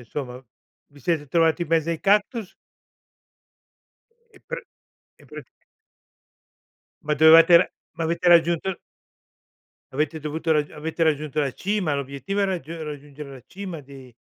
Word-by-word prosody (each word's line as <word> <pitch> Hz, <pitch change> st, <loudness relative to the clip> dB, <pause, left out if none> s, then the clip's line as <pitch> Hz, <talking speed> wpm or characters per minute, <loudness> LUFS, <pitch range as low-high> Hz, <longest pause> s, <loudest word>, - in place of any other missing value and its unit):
insomma? 125 Hz, +1 st, -6 dB, 0.6 s
Vi 145 Hz, -, -17 dB
siete 150 Hz, +1 st, -1 dB
trovati 165 Hz, +2 st, +2 dB
in 160 Hz, -, -5 dB
mezzo 165 Hz, 0 st, +1 dB
ai 165 Hz, -, -3 dB
cactus? 210 Hz, +1 st, +1 dB, 1.8 s
E -, -, -16 dB
pr -, -, -3 dB, 0.6 s
e -, -, -18 dB
pr -, -, -9 dB, 1.7 s
Ma 150 Hz, -, 0 dB
dovevate 160 Hz, +3 st, +8 dB
ra 180 Hz, -, +3 dB, 0.2 s
ma 165 Hz, -2 st, -4 dB
avete 170 Hz, +2 st, 0 dB
raggiunto 170 Hz, +2 st, +3 dB, 1.2 s
Avete 155 Hz, +3 st, -2 dB
dovuto 160 Hz, +2 st, -1 dB
rag 150 Hz, -1 st, 0 dB
avete 160 Hz, +2 st, -4 dB
raggiunto 155 Hz, -1 st, 0 dB
la 140 Hz, -, 0 dB
cima, 190 Hz, -5 st, -1 dB
l'obiettivo 140 Hz, +9 st, -3 dB
è -, -, +3 dB
raggiu 175 Hz, -6 st, -3 dB
è 160 Hz, -, -7 dB
raggiungere 145 Hz, -1 st, -8 dB
la 130 Hz, -3 st, -11 dB
cima 185 Hz, -5 st, -7 dB
di 135 Hz, -3 st, -14 dB
160 Hz, 140 wpm, -24 LUFS, 145-170 Hz, 1.8 s, dovevate